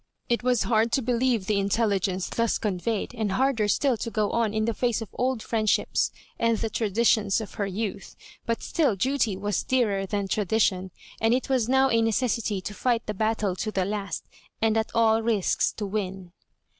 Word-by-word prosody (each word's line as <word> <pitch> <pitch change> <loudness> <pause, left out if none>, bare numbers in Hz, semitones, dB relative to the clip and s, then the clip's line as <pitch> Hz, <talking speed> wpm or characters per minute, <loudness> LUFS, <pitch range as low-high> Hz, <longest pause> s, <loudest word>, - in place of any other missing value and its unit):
It 235 - +1
was 245 -2 +2
hard 225 0 +2
to 270 - +2
believe 240 -3 +1
the 205 0 +1
intelligence 195 -3 0
thus 230 -1 0
conveyed, 210 +2 -2
and 220 -5 -2
harder 250 -2 +2
still 265 +4 +2
to 230 - -4
go 215 -2 0
on 230 -2 +1
in 215 0 0
the 230 - 0
face 240 0 0
of 225 -4 -7
old 255 -2 -1
friendships, 215 -2 +1 0.3
and 230 -1 +2
the 225 0 -3
traditions 215 -1 +2
of 220 - -7
her 205 -3 -2
youth; 200 0 -4 0.3
but 230 0 -1
still 295 - +1
duty 235 -1 0
was 205 0 -1
dearer 210 -7 0
than 200 0 -2
tradition, 195 -2 +1 0.3
and 225 +2 +3
it 260 - -3
was 250 -4 +1
now 265 0 +4
a 230 0 +3
necessity 225 -3 0
to 205 - -6
fight 235 +1 0
the 210 - -3
battle 215 -2 0
to 215 - -2
the 190 -3 0
last, 200 -3 -3 0.4
and 220 0 +2
at 220 0 0
aU 225 -1 +4
risks 220 -4 +1
to 210 - -4
win. 195 -3 -4
220 Hz, 190 wpm, -26 LUFS, 200-235 Hz, 0.4 s, now